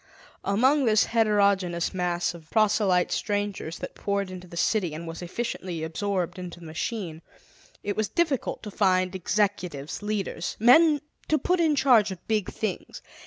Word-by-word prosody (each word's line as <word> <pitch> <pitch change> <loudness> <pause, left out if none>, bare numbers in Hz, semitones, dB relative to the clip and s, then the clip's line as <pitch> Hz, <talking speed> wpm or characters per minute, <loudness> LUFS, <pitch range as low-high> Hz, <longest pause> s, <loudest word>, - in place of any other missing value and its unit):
Among 260 +8 +3
this 220 -2 +4
heterogenous 200 -6 +2
mass 175 -1 -1
of 165 -2 -13
proselyte 205 -4 +2
strangers 205 -5 -2
that - - -7
poured 200 -2 -2
into 185 0 -9
the 170 - -10
city 180 -3 +1
and 165 +2 -7
was 165 +1 -7
efficiently 180 -3 -4
absorbed 180 +1 -2
into 175 -1 -7
the 170 - -12
machine, 165 0 -4 0.6
it 205 - -2
was 215 -1 0
yet - - -30
difficult 320 -7 0
to 210 - -6
find 185 -2 +2
executives, 185 -6 -1
leaders, 205 -2 -3
men 295 +6 +6 0.3
to 310 - +3
put 360 +6 +1
in 320 -3 +3
charge 245 -7 +5
of 185 -3 -9
big 215 -4 0
things. 215 -4 -5
200 Hz, 160 wpm, -26 LUFS, 175-220 Hz, 0.6 s, men